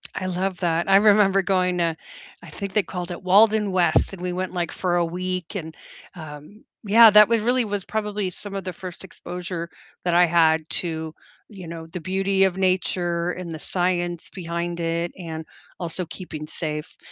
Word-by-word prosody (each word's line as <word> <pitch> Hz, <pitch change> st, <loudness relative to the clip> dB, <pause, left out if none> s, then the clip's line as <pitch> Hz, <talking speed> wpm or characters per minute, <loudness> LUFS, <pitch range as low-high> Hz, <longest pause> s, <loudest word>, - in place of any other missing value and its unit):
I 185 Hz, -, -3 dB
love 185 Hz, 0 st, -2 dB
that. 170 Hz, 0 st, 0 dB
I 195 Hz, -, +7 dB
remember 200 Hz, -1 st, +5 dB
going 185 Hz, -2 st, +1 dB
to, 165 Hz, -2 st, +1 dB, 0.5 s
I -, -, -11 dB
think 200 Hz, -2 st, -6 dB
they 210 Hz, -, +3 dB
called 180 Hz, 0 st, -6 dB
it 175 Hz, -, -7 dB
Walden 210 Hz, +2 st, +4 dB
West, 175 Hz, -4 st, +2 dB
and 185 Hz, -, -9 dB
we 180 Hz, 0 st, -2 dB
went, 185 Hz, +1 st, -3 dB
like, 175 Hz, -2 st, -2 dB
for 180 Hz, -2 st, -1 dB
a 175 Hz, -, +2 dB
week 180 Hz, +2 st, -4 dB
and, 160 Hz, -4 st, -5 dB, 0.4 s
um, 155 Hz, +5 st, -11 dB, 0.2 s
yeah, 225 Hz, +2 st, +8 dB
that 210 Hz, +1 st, +8 dB
was 230 Hz, -2 st, +2 dB
really 245 Hz, +1 st, +2 dB
was 205 Hz, -3 st, -3 dB
probably 210 Hz, -3 st, -2 dB
some 200 Hz, +2 st, -7 dB
of 195 Hz, -, -3 dB
the 185 Hz, -1 st, -5 dB
first 180 Hz, +1 st, -9 dB
exposure 175 Hz, -2 st, -6 dB, 0.3 s
that 175 Hz, -1 st, +1 dB
I 180 Hz, -, +7 dB
had 160 Hz, -2 st, +3 dB
to, 160 Hz, -2 st, -4 dB, 0.3 s
you 190 Hz, -5 st, -10 dB
know, 165 Hz, -1 st, -7 dB
the 180 Hz, -, -5 dB
beauty 195 Hz, +2 st, +1 dB
of 190 Hz, -1 st, +2 dB
nature 180 Hz, -2 st, 0 dB
and 180 Hz, -2 st, -6 dB
the 155 Hz, -, -6 dB
science 175 Hz, -1 st, -2 dB
behind 170 Hz, -1 st, -4 dB
it 170 Hz, +1 st, -1 dB
and 160 Hz, -3 st, -7 dB, 0.3 s
also 175 Hz, 0 st, -4 dB
keeping 160 Hz, -3 st, -7 dB
safe. 150 Hz, -1 st, -5 dB
180 Hz, 185 wpm, -23 LUFS, 170-195 Hz, 0.5 s, yeah